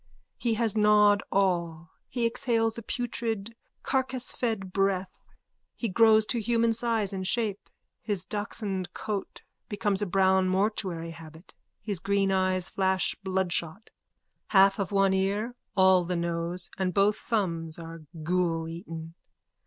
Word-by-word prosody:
He 230 Hz, -2 st, 0 dB
has 225 Hz, -2 st, 0 dB
gnawed 210 Hz, -1 st, +5 dB
all. 170 Hz, -4 st, 0 dB, 0.2 s
He 240 Hz, -2 st, -1 dB
exhales 230 Hz, -1 st, +1 dB
a 230 Hz, -, -4 dB
putrid 230 Hz, -2 st, -3 dB, 0.3 s
carcasefed 245 Hz, -7 st, -1 dB
breath. 195 Hz, -1 st, 0 dB, 0.6 s
He 230 Hz, -, -2 dB
grows 220 Hz, +2 st, +5 dB
to 235 Hz, +1 st, -1 dB
human 230 Hz, 0 st, +2 dB
size 225 Hz, -3 st, +1 dB
and 190 Hz, -1 st, -2 dB
shape. 215 Hz, -4 st, -1 dB, 0.3 s
His 200 Hz, -5 st, -1 dB
dachshund 205 Hz, -3 st, -3 dB
coat 205 Hz, -2 st, -5 dB, 0.3 s
becomes 205 Hz, -1 st, 0 dB
a 205 Hz, -, 0 dB
brown 190 Hz, 0 st, +3 dB
mortuary 185 Hz, -4 st, -1 dB
habit. 160 Hz, +1 st, -13 dB, 0.3 s
His 205 Hz, -4 st, -3 dB
green 195 Hz, +2 st, +1 dB
eye 185 Hz, -1 st, +2 dB
flashes 190 Hz, 0 st, 0 dB
bloodshot. 190 Hz, 0 st, -2 dB, 0.6 s
Half 195 Hz, 0 st, +5 dB
of 195 Hz, 0 st, -2 dB
one 195 Hz, -1 st, +3 dB
ear, 200 Hz, +5 st, 0 dB, 0.2 s
all 190 Hz, -1 st, +6 dB
the 180 Hz, +1 st, -2 dB
nose 170 Hz, +1 st, -2 dB
and 185 Hz, -2 st, -1 dB
both 205 Hz, +2 st, +3 dB
thumbs 170 Hz, -8 st, -2 dB
are 165 Hz, -1 st, -9 dB, 0.2 s
ghouleaten.) 165 Hz, -1 st, -2 dB
195 Hz, 130 wpm, -28 LUFS, 180-220 Hz, 0.6 s, all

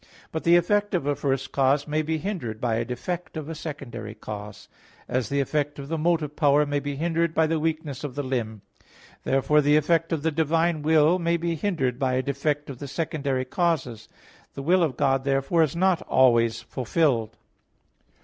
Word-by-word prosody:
But 160 Hz, -, -4 dB
the 170 Hz, +1 st, +6 dB
effect 205 Hz, +3 st, +2 dB
of 170 Hz, -, -1 dB
a 145 Hz, 0 st, +1 dB
first 135 Hz, -1 st, -2 dB
cause 140 Hz, +2 st, +2 dB
may 155 Hz, +1 st, 0 dB
be 160 Hz, +1 st, -1 dB
hindered 155 Hz, -, -4 dB
by 115 Hz, -2 st, 0 dB
a 115 Hz, -, 0 dB
defect 165 Hz, +9 st, -5 dB
of 155 Hz, -2 st, -5 dB
a 165 Hz, -, -4 dB
secondary 125 Hz, -9 st, -7 dB
cause; 105 Hz, -1 st, -8 dB, 0.4 s
as 125 Hz, -2 st, -1 dB
the 140 Hz, -, 0 dB
effect 145 Hz, +1 st, -1 dB
of 140 Hz, 0 st, -8 dB
the 165 Hz, -, -1 dB
motive 155 Hz, -2 st, 0 dB
power 145 Hz, 0 st, +4 dB
may 145 Hz, 0 st, -1 dB
be 145 Hz, 0 st, -4 dB
hindered 165 Hz, +2 st, 0 dB
by 160 Hz, -, +4 dB
the 160 Hz, 0 st, 0 dB
weakness 155 Hz, -3 st, -3 dB
of 140 Hz, -4 st, -5 dB
the 145 Hz, -, -2 dB
limb. 115 Hz, -6 st, -3 dB, 0.6 s
Therefore 135 Hz, +3 st, +3 dB
the 145 Hz, +1 st, +4 dB
effect 165 Hz, +2 st, +1 dB
of 160 Hz, -3 st, -1 dB
the 160 Hz, -, +1 dB
divine 160 Hz, +1 st, +1 dB
will 160 Hz, +3 st, +4 dB
may 170 Hz, 0 st, +1 dB
be 170 Hz, 0 st, -1 dB
hindered 150 Hz, -, -1 dB
by 130 Hz, -2 st, +1 dB
a 130 Hz, +1 st, +1 dB
defect 145 Hz, +2 st, -1 dB
of 135 Hz, -3 st, -8 dB
the 140 Hz, -, -6 dB
secondary 140 Hz, -3 st, -2 dB
causes. 130 Hz, -7 st, -1 dB, 0.5 s
The 135 Hz, -, -5 dB
will 180 Hz, +5 st, +3 dB
of 150 Hz, -7 st, 0 dB
God, 135 Hz, -2 st, +2 dB
therefore, 135 Hz, +4 st, +1 dB
is 160 Hz, +1 st, +1 dB
not 185 Hz, 0 st, +2 dB
always 115 Hz, -3 st, +3 dB
fulfilled. 130 Hz, -4 st, 0 dB
145 Hz, 195 wpm, -25 LUFS, 130-165 Hz, 0.6 s, the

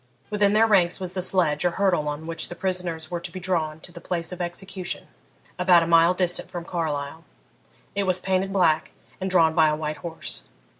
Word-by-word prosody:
Within 205 Hz, -1 st, +3 dB
their 220 Hz, +1 st, +5 dB
ranks 185 Hz, -5 st, +3 dB
was 185 Hz, -1 st, -5 dB
the 185 Hz, -, -2 dB
sledge 175 Hz, -5 st, +2 dB
or 175 Hz, -, +3 dB
hurdle 185 Hz, -6 st, +2 dB
on 150 Hz, +2 st, -4 dB
which 165 Hz, 0 st, -4 dB
the 175 Hz, -, -7 dB
prisoners 175 Hz, -3 st, -3 dB
were 175 Hz, -, -2 dB
to 170 Hz, -, -8 dB
be 185 Hz, -, -6 dB
drawn 165 Hz, -4 st, -1 dB
to 175 Hz, -, -11 dB
the 170 Hz, -1 st, -11 dB
place 170 Hz, -1 st, -3 dB
of 180 Hz, 0 st, -6 dB
execution, 185 Hz, +1 st, -5 dB, 0.5 s
about 180 Hz, -2 st, +5 dB
a -, -, -1 dB
mile 170 Hz, +1 st, +5 dB
distant 180 Hz, -1 st, 0 dB
from 175 Hz, -1 st, -6 dB
Carlisle. 160 Hz, -2 st, -3 dB, 0.7 s
It 200 Hz, 0 st, 0 dB
was 185 Hz, -1 st, +1 dB
painted 190 Hz, 0 st, 0 dB
black, 170 Hz, -5 st, +2 dB, 0.3 s
and 190 Hz, -, -2 dB
drawn 165 Hz, -3 st, +4 dB
by 160 Hz, -2 st, +5 dB
a 150 Hz, -, +1 dB
white 155 Hz, 0 st, -4 dB
horse. 165 Hz, -, -6 dB
175 Hz, 205 wpm, -25 LUFS, 160-185 Hz, 0.7 s, their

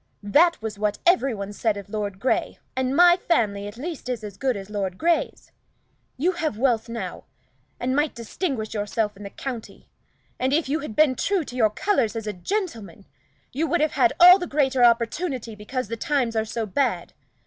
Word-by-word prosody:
That 330 Hz, -, +4 dB
was 215 Hz, -2 st, -5 dB
what 210 Hz, -1 st, 0 dB
every 275 Hz, -9 st, +3 dB
one 200 Hz, 0 st, -6 dB
said 215 Hz, 0 st, 0 dB
of 200 Hz, -, -8 dB
Lord 205 Hz, -2 st, -4 dB
Grey, 255 Hz, -, 0 dB, 0.2 s
and 260 Hz, +1 st, 0 dB
my 350 Hz, +1 st, +7 dB
family 205 Hz, -, 0 dB
at 205 Hz, -, -9 dB
least 300 Hz, -1 st, -6 dB
is 240 Hz, -3 st, -3 dB
as 205 Hz, -2 st, -7 dB
good 255 Hz, 0 st, -1 dB
as 195 Hz, -1 st, -8 dB
Lord 195 Hz, -3 st, -3 dB
Grey's. 340 Hz, +1 st, 0 dB, 0.7 s
You 335 Hz, +8 st, +2 dB
have 320 Hz, -, -3 dB
wealth 230 Hz, -2 st, +1 dB
now, 230 Hz, 0 st, -6 dB, 0.5 s
and 255 Hz, +2 st, -1 dB
might 295 Hz, +1 st, +1 dB
distinguish 235 Hz, -, -3 dB
yourself 210 Hz, 0 st, -1 dB
in 200 Hz, -, -14 dB
the 200 Hz, -, -7 dB
county; 245 Hz, 0 st, -7 dB, 0.5 s
and 260 Hz, +2 st, +1 dB
if 315 Hz, 0 st, +1 dB
you 295 Hz, +4 st, 0 dB
had 275 Hz, -8 st, -7 dB
been 305 Hz, -4 st, +4 dB
true 380 Hz, +7 st, 0 dB
to 250 Hz, -, -10 dB
your 225 Hz, -4 st, +3 dB
colors 235 Hz, -, 0 dB
as 225 Hz, -1 st, -4 dB
a 210 Hz, -, -3 dB
gentleman, 210 Hz, -, -4 dB, 0.5 s
you 310 Hz, +5 st, 0 dB
would 345 Hz, -, +1 dB
have 310 Hz, 0 st, +2 dB
had 350 Hz, -, +3 dB
all 360 Hz, +2 st, +9 dB
the 355 Hz, -, -4 dB
greater 270 Hz, -4 st, +2 dB
opportunity, 240 Hz, +1 st, +1 dB
because 215 Hz, +4 st, -4 dB
the 230 Hz, -, -4 dB
times 260 Hz, -4 st, 0 dB
are 220 Hz, 0 st, +1 dB
so 225 Hz, +1 st, -3 dB
bad. 210 Hz, -4 st, -1 dB
245 Hz, 195 wpm, -24 LUFS, 210-300 Hz, 0.7 s, all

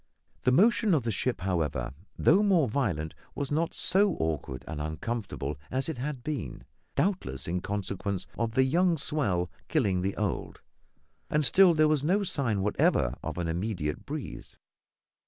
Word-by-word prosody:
The 125 Hz, -, +5 dB
motion 210 Hz, -, +4 dB
of 140 Hz, -, +1 dB
the 115 Hz, -, -1 dB
ship, 120 Hz, +1 st, -1 dB
however, 85 Hz, -9 st, -1 dB, 0.2 s
though 185 Hz, +6 st, +5 dB
more 185 Hz, -9 st, +4 dB
violent, 100 Hz, -, -1 dB, 0.2 s
was 140 Hz, -1 st, -3 dB
not 160 Hz, +3 st, 0 dB
so 195 Hz, 0 st, +3 dB
awkward 75 Hz, -5 st, -3 dB
and 75 Hz, -, -4 dB
uncomfortable 80 Hz, -3 st, -4 dB
as 130 Hz, +1 st, -1 dB
it 155 Hz, -, -4 dB
had 135 Hz, -1 st, -4 dB
been, 135 Hz, -, -4 dB, 0.3 s
doubtless 180 Hz, -, -1 dB
in 90 Hz, +2 st, 0 dB
consequence 100 Hz, -1 st, -3 dB
of 115 Hz, -1 st, -1 dB
the 130 Hz, +1 st, +4 dB
young 170 Hz, +5 st, +3 dB
swell 100 Hz, -, 0 dB, 0.2 s
killing 100 Hz, -, +1 dB
the 95 Hz, +1 st, -2 dB
old; 105 Hz, -3 st, -3 dB, 0.7 s
and 150 Hz, -1 st, +2 dB
still 185 Hz, +2 st, +6 dB
there 155 Hz, 0 st, +5 dB
was 150 Hz, -2 st, +2 dB
no 190 Hz, +7 st, +2 dB
sign 115 Hz, -, 0 dB
whatever -, -, +2 dB
of -, -, -5 dB
an 90 Hz, -1 st, -1 dB
immediate 85 Hz, -3 st, -2 dB
breeze. -, -, -6 dB
115 Hz, 155 wpm, -29 LUFS, -, 0.7 s, still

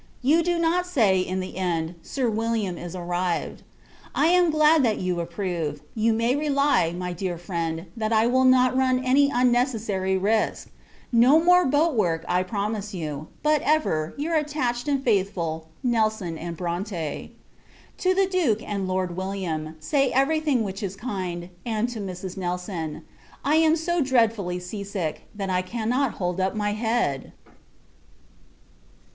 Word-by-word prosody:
You 305 Hz, +6 st, +4 dB
do 345 Hz, +1 st, 0 dB
not 340 Hz, +2 st, +1 dB
say, 215 Hz, -, +3 dB
in 185 Hz, +1 st, -2 dB
the 185 Hz, -, -7 dB
end, 170 Hz, -3 st, -1 dB
Sir 255 Hz, +8 st, -2 dB
William 220 Hz, -4 st, -1 dB
is 175 Hz, +1 st, -7 dB
arrived. 175 Hz, -2 st, -2 dB, 0.5 s
I 295 Hz, +5 st, +3 dB
am 355 Hz, -1 st, +4 dB
glad, 310 Hz, 0 st, +5 dB
that 225 Hz, -5 st, +2 dB
you 180 Hz, -1 st, -1 dB
approve. 170 Hz, -4 st, -3 dB
You 225 Hz, 0 st, +2 dB
may 230 Hz, +3 st, +1 dB
rely, 285 Hz, -, +2 dB
my 180 Hz, +1 st, -4 dB
dear 175 Hz, 0 st, -3 dB
friend, 165 Hz, -1 st, -3 dB
that 220 Hz, -1 st, -2 dB
I 220 Hz, 0 st, +4 dB
will 255 Hz, +2 st, +3 dB
not 255 Hz, 0 st, +5 dB
run 255 Hz, -1 st, +2 dB
any 280 Hz, +2 st, +4 dB
unnecessary 235 Hz, -7 st, +1 dB
risk! 215 Hz, +3 st, 0 dB, 0.4 s
No 250 Hz, +6 st, +6 dB
more 360 Hz, +1 st, +5 dB
boat 295 Hz, +4 st, +2 dB
work, 170 Hz, -7 st, 0 dB
I 180 Hz, -, +2 dB
promise 205 Hz, +1 st, -3 dB
you; 155 Hz, -3 st, -5 dB, 0.2 s
but, 305 Hz, -1 st, +3 dB
ever, 165 Hz, -, +1 dB
your 310 Hz, +4 st, -2 dB
attached 290 Hz, -5 st, -1 dB
and 275 Hz, -2 st, 0 dB
faithful 185 Hz, -8 st, 0 dB, 0.2 s
NELSON 220 Hz, -7 st, 0 dB, 0.2 s
& -, -, -19 dB
BRONTE. 175 Hz, -2 st, -4 dB, 0.7 s
To 370 Hz, 0 st, +2 dB
the 390 Hz, 0 st, +4 dB
Duke, 325 Hz, -, +1 dB
and 200 Hz, -2 st, -2 dB
Lord 185 Hz, -1 st, -1 dB
William, 180 Hz, -5 st, -3 dB
say 275 Hz, -, +1 dB
every 275 Hz, +4 st, +3 dB
thing 285 Hz, -7 st, +1 dB
which 195 Hz, 0 st, -5 dB
is 195 Hz, -2 st, -4 dB
kind; 185 Hz, -6 st, -4 dB
and 225 Hz, 0 st, -1 dB
to 240 Hz, -2 st, -6 dB
Mrs. 185 Hz, -2 st, -6 dB
Nelson. 175 Hz, -4 st, -4 dB, 0.4 s
I 300 Hz, +3 st, +4 dB
am 320 Hz, 0 st, +4 dB
so 345 Hz, +1 st, 0 dB
dreadfully 225 Hz, -9 st, +1 dB
sea 190 Hz, +3 st, -6 dB
sick, 185 Hz, -6 st, -4 dB
that 195 Hz, -2 st, -3 dB
I 180 Hz, 0 st, +2 dB
cannot 235 Hz, +7 st, -1 dB
hold 180 Hz, 0 st, -2 dB
up 190 Hz, +2 st, 0 dB
my 210 Hz, -1 st, 0 dB
head! 220 Hz, -, -1 dB
215 Hz, 155 wpm, -25 LUFS, 180-260 Hz, 0.7 s, No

